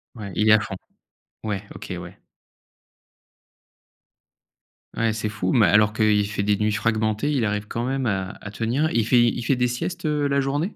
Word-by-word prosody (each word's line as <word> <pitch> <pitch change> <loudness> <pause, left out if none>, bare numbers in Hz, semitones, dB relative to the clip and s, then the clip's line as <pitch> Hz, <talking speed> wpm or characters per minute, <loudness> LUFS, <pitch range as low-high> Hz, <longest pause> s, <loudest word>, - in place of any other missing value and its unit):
Ouais, 105 -4 -7
il 105 0 +2
est - - +8
à 110 - +6
fond. 100 -2 -5 0.7
Ouais, 105 -3 -2
OK, - - -7
ouais. - - -11 2.8
Ouais, 115 -1 +1
c'est 110 0 -3
fou, 95 -3 -2
mais 115 -4 +5
alors 105 +4 +4
qu'il 105 -1 +2
fait 100 -1 -2
des 105 0 +2
nuits 105 +1 0
fragmentées, 110 +4 0
il 130 -6 +1
arrive 105 0 -2
quand 115 - -3
même 130 +1 -1
à 95 -3 -2
à 100 - -8
tenir. 120 +9 0
Il 115 -1 +1
fait 120 -1 +5
il 120 +1 +1
fait 135 +3 +2
des 125 0 +1
siestes, 160 +8 -4
heu, 150 -1 +1
la 140 0 +1
journée? 145 +8 -1
110 Hz, 190 wpm, -23 LUFS, 105-125 Hz, 2.8 s, est